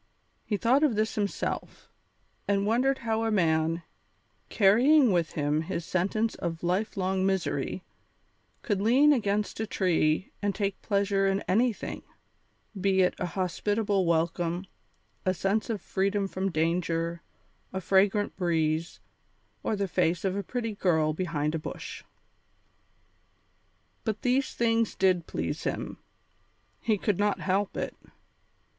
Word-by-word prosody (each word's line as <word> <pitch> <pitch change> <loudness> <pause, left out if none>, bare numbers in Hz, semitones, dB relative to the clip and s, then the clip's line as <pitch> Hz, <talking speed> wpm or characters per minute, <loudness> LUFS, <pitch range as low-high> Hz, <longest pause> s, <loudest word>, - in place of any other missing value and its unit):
He 210 - -1
thought 250 +7 +3
of 295 -7 +3
this 215 +1 0
himself, 205 -2 -3 0.6
and 200 0 +2
wondered 255 +5 +2
how 225 0 0
a 225 - +1
man, 165 -4 +1 0.7
carrying 245 +6 +5
with 170 -3 +1
him 150 0 0
his 165 +1 -4
sentence 200 +6 0
of 165 -1 -5
lifelong 190 0 0
misery, 190 -1 -1 0.8
could 205 -3 0
lean 265 +8 +5
against 210 -5 -1
a 220 - -2
tree 170 -3 +1
and 205 -1 0
take 200 -2 -2
pleasure 200 -1 +1
in 195 0 +1
anything, 225 +3 0 0.7
be 190 -1 +2
it 180 - +2
a - - -1
hospitable 195 +2 0
welcome, 170 +2 0 0.6
a 185 0 +1
sense 195 +6 0
of 220 -3 -1
freedom 195 +2 0
from 190 0 -2
danger, 165 0 -1 0.5
a 190 - -3
fragrant 195 +3 +2
breeze, 165 -2 0 0.6
or 220 - -1
the 200 -1 -1
face 175 0 0
of 190 0 0
a 200 - -1
pretty 225 +2 -3
girl 160 -6 +2
behind 155 -3 -1
a 165 - -1
bush. - - -7 2.0
But 220 -2 -3
these 260 +2 +1
things 230 -1 +1
did 185 -3 +2
please - - -3
him; - - -3 0.8
he 220 -2 +1
could 205 -1 0
not 205 0 +1
help 195 +1 0
it. - - -3
195 Hz, 130 wpm, -28 LUFS, 175-215 Hz, 2.0 s, carrying